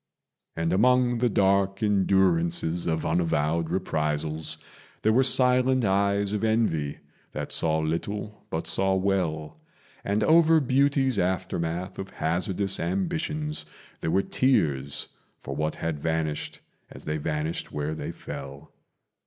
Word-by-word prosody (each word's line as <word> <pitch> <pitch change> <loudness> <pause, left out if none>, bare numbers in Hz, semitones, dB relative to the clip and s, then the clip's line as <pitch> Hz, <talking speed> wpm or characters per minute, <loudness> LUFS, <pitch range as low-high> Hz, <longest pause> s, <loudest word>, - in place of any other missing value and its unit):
And 80 +1 0
among 125 +3 +3
the 120 0 +2
dark 100 0 +2
endurances 90 -4 +2
of 80 -1 -1
unavowed 80 -1 0
reprisals 80 -3 -1 0.5
There 110 - +4
were 130 - +5
silent 130 -1 +4
eyes 100 +1 +1
of 105 - -2
envy 110 -10 +1 0.4
that - - -5
saw 80 -1 +2
little 100 +7 -3
but 80 - -3
saw 95 0 +2
well; 90 -6 -1 0.4
And 105 +2 0
over 160 +2 +5
beauty's 135 -3 +2
aftermath 90 -1 -2
of 95 0 -5
hazardous 95 +4 -1
ambitions 160 -5 -2 0.3
There - - -2
were 95 +4 +2
tears 75 - +1 0.4
for 70 - -5
what 75 +1 -1
had 80 -2 -3
vanished 80 -1 -2 0.3
as - - -12
they 75 0 -2
vanished 75 +1 -3
where 75 +1 -3
they 80 - -5
fell. 70 +2 -9
95 Hz, 125 wpm, -26 LUFS, 80-110 Hz, 0.5 s, were